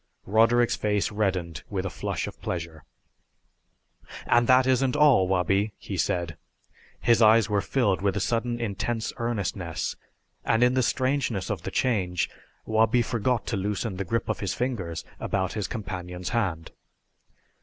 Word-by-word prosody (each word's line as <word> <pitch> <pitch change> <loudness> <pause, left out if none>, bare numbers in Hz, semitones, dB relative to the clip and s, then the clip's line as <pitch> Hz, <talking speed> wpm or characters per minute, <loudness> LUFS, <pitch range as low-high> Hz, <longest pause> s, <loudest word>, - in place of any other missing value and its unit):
Roderick's 115 +3 +3
face 105 -1 0
reddened 95 -5 -1
with 95 -2 -2
a 95 - -3
flush - - -3
of - - -9
pleasure. 80 -3 -5 1.4
"And 120 0 +3
that 130 0 +6
isn't 130 0 +2
all, 145 -11 +5
Wabi," 95 +3 +1
he - - -6
said. 85 -3 -1 0.6
His 120 0 +3
eyes 110 -1 +5
were 100 -1 +2
filled 105 -8 +1
with 100 0 0
a - - +1
sudden 120 +3 -1
intense 115 +1 -2
earnestness, 100 -8 -2 0.5
and 115 +2 +2
in 125 0 +4
the 130 - +2
strangeness 130 -6 0
of 100 -6 -3
the - - -5
change 95 -9 0 0.3
Wabi 110 +2 +3
forgot 120 +1 -1
to 110 - -2
loosen 100 +1 -2
the 95 - -2
grip 115 +5 -2
of 110 - -2
his 95 -2 -2
fingers 100 -10 -3
about 95 -1 -1
his 105 -3 -2
companion's 90 -5 -5
hand. 95 -9 -2
105 Hz, 150 wpm, -26 LUFS, 95-120 Hz, 1.4 s, that